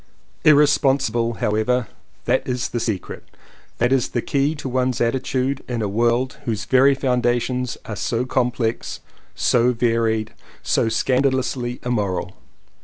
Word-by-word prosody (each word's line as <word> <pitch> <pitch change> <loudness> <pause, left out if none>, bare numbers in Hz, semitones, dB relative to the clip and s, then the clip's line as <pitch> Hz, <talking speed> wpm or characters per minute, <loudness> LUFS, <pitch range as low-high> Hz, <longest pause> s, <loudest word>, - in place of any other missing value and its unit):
Irresponsible 135 -5 +3
however 110 +4 0 0.2
— - - -37
that 130 - +1
is 125 -1 -2
the 120 - -2
secret, 110 -5 -4 0.5
that 120 +2 +2
is 130 -3 +1
the 120 - -1
key 140 +2 0
to 145 - -6
one's 130 -1 0
atti 120 +2 0
tude 135 +1 -1
in 120 -3 -2
a - - 0
world 120 +6 0
whose 110 -4 -2
very 135 +2 +4
foundations 125 -1 0
are 105 - -5
so 115 +4 -1
complex, 125 -3 -1 0.3
so 125 +1 +3
varied, 115 -2 0 0.3
so 115 - +1
scandalously 130 0 0
im 125 - 0
moral. 95 -4 -2
125 Hz, 140 wpm, -21 LUFS, 115-130 Hz, 0.5 s, very